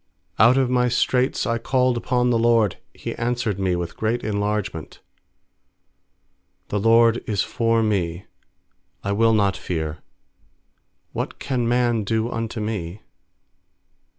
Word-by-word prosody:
fiOut 120 +5 +6
of 135 -1 +3
my 125 0 +2
straits 125 +2 +1
I 115 0 0
called 125 +1 +1
upon 125 +1 +1
the 115 - +2
LORD; 115 -4 +2
He - - -6
answered 120 -4 -1
me 95 -2 +1
with 85 -1 -4
great 115 +2 -1
en 105 -1 -2
largement, 100 -6 -3
i - - -27
6The 105 -1 0
LORD 115 +1 +4
is 105 -3 0
forme; 105 -7 0 0.8
I 100 - -2
will 115 +2 +3
not 100 -3 +2
fear; 80 -3 -4 1.1
What - - -4
can 125 -4 -2
man 120 -2 +1
do 110 +3 -1
unto 115 0 -4
me? 105 -3 -4
115 Hz, 130 wpm, -22 LUFS, 100-120 Hz, 1.1 s, fiOut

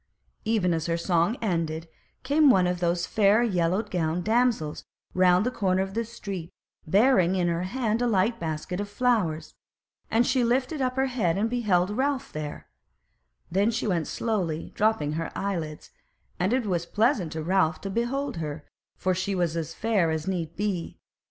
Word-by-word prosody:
Even 210 -6 +2
as 160 0 -2
her 165 0 0
song 170 +6 +1
ended 165 -4 -1 0.4
came 290 +2 +4
one 190 -7 +5
of 180 0 -1
those 175 0 0
fair 215 +2 +3
yellow 185 -2 +1
gowned 175 -4 -1
damsels 220 -8 +1 0.3
round 185 +2 +4
the 250 - 0
corner 190 -5 +1
of 195 0 -7
the 230 +2 0
street, 200 -7 -7 0.4
bearing 190 -1 +4
in 180 -2 +1
her 170 0 0
hand 225 +2 -1
a 245 - +2
light 225 +2 +1
basket 160 +1 -3
full - - -2
of 205 - -5
flowers: 205 -8 0 0.6
and 230 +2 +3
she 250 0 +2
lifted 255 +5 0
up 255 -1 0
her 265 0 +2
head 220 -10 0
and 220 +3 0
beheld 200 -6 +1
Ralph 275 +1 -1
there; 150 -1 -6 0.8
then 200 +5 +3
she 230 0 -2
went 175 -6 0
slowly 180 -9 -1
and - - -12
dropped 220 -3 +2
her 155 +3 -3
eyelids, 165 -6 -4 0.5
and 185 +3 +1
it 255 -1 +1
was 175 -4 -1
pleasant 215 - +1
to 160 -1 -4
Ralph 165 -2 +2
to 195 - -4
behold 250 +3 -2
her; 150 -2 -5 0.3
for 185 - 0
she 185 +2 -2
was 175 -3 0
as 165 -1 -4
fair 210 -7 +1
as 160 +1 -2
need 170 -4 -2
be. 195 -4 -3
190 Hz, 180 wpm, -26 LUFS, 170-230 Hz, 0.8 s, one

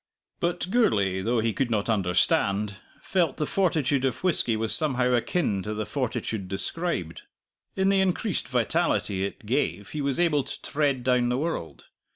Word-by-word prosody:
But 175 +1 -1
Gourlay, 100 - +2
though 115 +3 +1
he 115 0 0
could 135 +2 -1
not 105 -3 0
understand, 100 0 +1 0.3
felt 175 -4 0
the 150 - 0
fortitude 150 -7 +1
of 135 +5 -1
whisky 155 -11 +2
was 110 0 +3
somehow 125 -5 +3
akin 120 - 0
to 105 +3 -4
the 110 0 -3
fortitude 110 -4 -3
described. 95 - -3 0.5
In 190 0 +2
the 195 -1 +3
increased 190 +1 0
vitality 125 - 0
it 100 +2 -5
gave 105 - -1
he 150 - -4
was 140 +2 -1
able 155 -5 +2
to - - -6
tread 140 -4 0
down 125 -1 +2
the 125 - 0
world. 150 - -4
125 Hz, 165 wpm, -26 LUFS, 105-160 Hz, 0.5 s, was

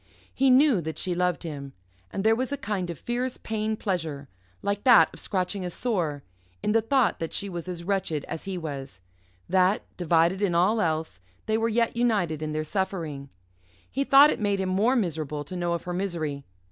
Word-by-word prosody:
He 270 0 +3
knew 260 - +5
that 160 0 -5
she 180 - -1
loved 180 0 0
him, 140 -4 -6 0.4
and 195 - -3
there 220 +1 +5
was 255 +3 -2
a 285 - -1
kind 200 -6 -3
of 170 - -5
fierce 245 - -3
pain 220 0 -2
pleasure 160 -9 -3 0.4
like 200 0 -1
that 245 -3 +6
of - - -9
scratching 190 0 -2
a 180 - -3
sore 170 - -2 0.4
in - - +1
the 225 +1 +4
thought 255 +2 +2
that 165 - -4
she 200 - -2
was 175 -1 -6
as 175 -2 -5
wretched 170 -6 -1
as 165 - -6
he 190 -1 -3
was, 135 - -6 0.5
that, 185 +2 +3
divided 170 +2 +2
in 190 -4 +1
all 205 +6 +3
else, 155 - -2 0.2
they 220 - +1
were 225 +1 +1
yet 230 +1 +1
united 205 -10 +1
in 155 0 -3
their 155 0 -1
suffering. 160 -6 -3 0.6
He 275 - 0
thought 280 +2 +7
it - - -3
made 205 -2 0
him 190 -1 -1
more 210 +8 +2
miserable 155 - -1
to 185 - -8
know 175 -1 -1
of 170 - -3
her 175 - -4
misery. 165 -7 -3
185 Hz, 200 wpm, -26 LUFS, 160-220 Hz, 0.6 s, thought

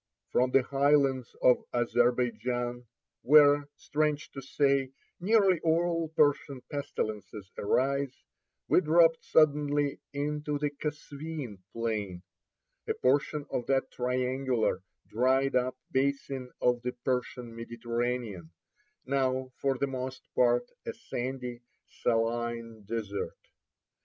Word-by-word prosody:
From 125 +1 +3
the 130 0 +4
high 140 +3 +3
lands 135 -4 0
of 125 - +7 0.2
Azerbeidjan, 120 0 0 0.4
where, 145 0 +6
strange 150 0 -1
to 135 - -7
say, 135 0 +1 0.3
nearly 195 -2 +4
all 165 0 +1
Persian 145 -3 +2
pestilences 105 -8 -4
arise, 135 +4 0 0.4
we - - +5
dropped 165 0 +4
suddenly 145 -2 +2
into 150 +1 -2
the 145 0 -1
Kasveen 145 -5 -6
plain, 105 -6 -3 0.6
a - - 0
portion 145 +3 +1
of 120 - -2
that 135 -1 +1
triangular, 125 -4 0 0.3
dried 130 +4 +2
up 125 0 +1
basin 135 -1 -1
of 125 -1 +2
the 125 0 -3
Persian 125 -2 -2
Mediterranean, 115 -5 -3 0.6
now 130 -1 0
for 135 -1 0
the 140 - +1
most 130 -1 -5
part 120 0 +3 0.2
a - - -2
sandy, 125 -1 -5 0.2
saline 115 -1 -2
desert. 105 -2 -4
130 Hz, 105 wpm, -30 LUFS, 120-145 Hz, 0.6 s, of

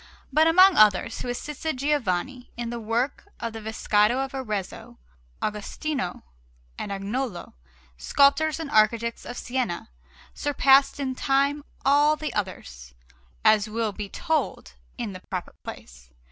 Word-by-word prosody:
But 310 +3 +5
among 370 +3 +6
others 215 +1 +4
who 245 - -4
assisted 300 +4 -4
Giovanni 255 -3 -1
in 235 -1 -4
the 240 - -4
work 230 +5 -2
of 230 -1 -4
the 225 - -7
Vescovado 220 +3 +1
in 270 - -10
Arezzo, 215 -8 -5 0.5
Agostino 215 +2 -3 0.5
and 200 - -5
Agnolo, 200 +1 -4 0.5
sculptors 290 - +3
and 315 -3 -5
architects 230 +2 +2
of 245 - -6
Siena, 245 - -3 0.4
surpassed 275 -1 +3
in 265 -2 -2
time 280 +2 +1 0.2
all 290 +2 +5
the 305 0 -5
others, 65 - -5 0.5
as 215 0 +5
will 225 0 -1
be 205 0 -6
told 320 - -2 0.2
in 230 -5 -4
the 185 - -8
proper 185 -2 -4
place. - - -10
240 Hz, 130 wpm, -25 LUFS, 210-280 Hz, 0.5 s, among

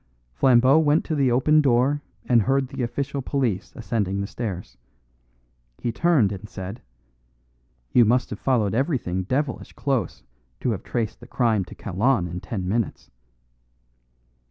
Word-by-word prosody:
Flambeau 130 - +5
went 155 0 +3
to 160 - -2
the 140 -4 +2
open 150 +5 +4
door 135 +2 +2 0.2
and 120 -2 +4
heard 135 +3 +1
the 135 -1 -5
official 140 +3 -2
police 125 -8 -1
ascending 105 -6 -2
the 100 - -1
stairs. 100 -3 -5 1.0
He 120 - -2
turned 140 - +3
and 100 +1 -7
said: 95 +6 -7 1.1
"You 120 - +6
must 125 +3 +2
have 105 - -5
followed 115 -7 +1
everything 120 - 0
devilish 130 +5 -2
close 130 - -2 0.4
to 125 - +1
have 100 -3 -3
traced 110 -2 -3
the 120 - -13
crime 115 -6 +1
to - - -12
Kalon 105 +1 0
in 90 +1 -5
ten 95 0 -4
minutes." 110 +2 -2
120 Hz, 145 wpm, -24 LUFS, 100-135 Hz, 1.1 s, You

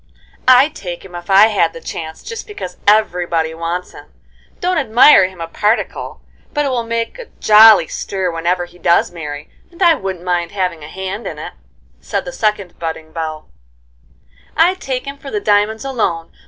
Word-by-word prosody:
"I'd 260 +4 +6
take 175 - -7
him 185 - -13
if 175 +1 -9
I 200 +3 +7
had 195 -6 +1
the - - -9
chance, 160 -1 -7
just 460 0 -7
because 185 - -8
everybody 175 -6 +2
wants 170 +2 -4
him. - - -14 0.5
Don't 360 -1 0
admire 240 -5 +6
him 185 -1 -14
a 165 - -3
particle, 210 +7 -2 0.3
but 295 0 +1
it - - 0
will 250 -2 0
make 230 - -3
a - - -7
jolly 215 0 +7
stir 190 -2 -3
whenever 175 +2 -1
he 175 0 -19
does 170 0 +2
marry, 150 -3 -7 0.2
and 340 - -18
I 340 -2 +7
wouldn't 190 - -5
mind 175 0 -1
having 180 -5 -2
a - - -8
hand 190 +5 -6
in - - -6
it," - - -7 0.5
said - - -3
the - - -7
second 210 - -2
budding 160 -1 -5
belle. 155 -1 -5 1.1
"I'd 360 +3 +3
take 260 -1 -3
him 280 0 -7
for 280 - -9
the 210 - -2
diamonds 210 +3 +1
alone. 190 -11 -2
190 Hz, 180 wpm, -17 LUFS, 170-235 Hz, 1.1 s, I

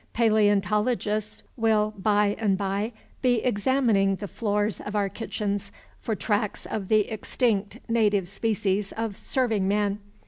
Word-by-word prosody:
Paleontologists 210 0 +1
will 215 -2 +2
by 205 0 +2
and 200 -4 +2
by 200 +3 -1 0.3
be 250 -2 +3
examining 220 -4 +2
the 205 +2 -6
floors 210 +2 -1
of 205 - -6
our 200 -1 +1
kitchens 205 -2 -3 0.3
for 220 - -2
tracks 205 0 -1
of 205 -3 -4
the 215 +1 +4
extinct 215 -1 -1
native 210 -5 +2
species 200 -1 -1
of 225 -2 -3
serving 225 -7 0
man. 205 0 +1
210 Hz, 130 wpm, -26 LUFS, 200-225 Hz, 0.3 s, the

